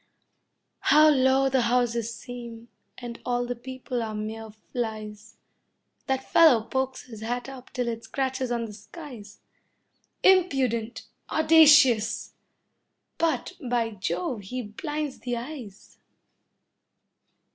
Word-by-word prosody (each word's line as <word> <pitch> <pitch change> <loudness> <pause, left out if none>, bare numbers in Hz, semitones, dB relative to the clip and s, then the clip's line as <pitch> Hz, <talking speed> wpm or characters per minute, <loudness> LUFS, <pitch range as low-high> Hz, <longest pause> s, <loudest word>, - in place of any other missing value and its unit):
How 305 +1 +6
low 265 -1 +3
the 265 -1 +2
houses 235 -1 +1
seem, 235 0 -9 0.3
and 240 -1 -8
all 245 0 -1
the 245 0 -3
people 255 0 -5
are 220 -1 -4
mere 220 +1 -5
flies. 215 -1 -6 0.7
That 265 0 0
fellow 290 -10 +6
pokes 265 +3 -3
his 225 -4 -11
hat 245 +3 -3
up 265 -2 -11
till 250 -2 -2
it 230 -1 -4
scratches 265 -2 -2
on 235 -1 -1
the 215 - -9
skies. 220 -2 -11 0.8
Impudent! 255 -11 +2 0.2
Audacious! 295 -9 +5 0.9
But, 330 -1 0
by 240 -3 -1
Jove, 185 +2 -3
he 250 +6 -5
blinds 295 +6 -5
the 245 -1 -3
eyes! 235 -6 -9
245 Hz, 115 wpm, -26 LUFS, 225-265 Hz, 0.9 s, How